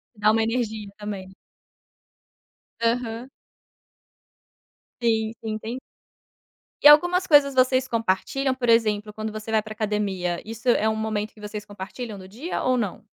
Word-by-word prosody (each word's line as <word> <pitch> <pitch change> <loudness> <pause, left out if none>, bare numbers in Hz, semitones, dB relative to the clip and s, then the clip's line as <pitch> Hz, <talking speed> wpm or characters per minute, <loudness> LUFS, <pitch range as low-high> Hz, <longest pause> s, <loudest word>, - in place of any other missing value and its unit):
Dá 210 +1 +3
uma 225 0 +2
energia 220 -3 -2
também. 200 -3 -6 1.5
Aham. 230 +1 -1 1.7
Sim, 220 -1 +1
sim 215 -1 -2
tem 235 +4 -6 1.0
E - - +10
algumas 350 +5 +6
coisas 285 -3 +6
vocês 255 0 +3
compartilham, 235 +5 0
por 245 -2 -3
exemplo, 215 -2 +2
quando 215 0 -4
você 215 +1 -6
vai 220 -1 +3
para 215 0 -11
academia, 200 -5 -2
isso 225 +2 -8
é 220 -2 +4
um 220 - -1
momento 220 -1 -2
que 215 - -20
vocês 210 0 -6
compartilham 205 +2 -7
no 185 0 -11
dia 260 - -4
ou 255 0 +2
não? 215 -3 -3
220 Hz, 140 wpm, -24 LUFS, 210-245 Hz, 1.7 s, E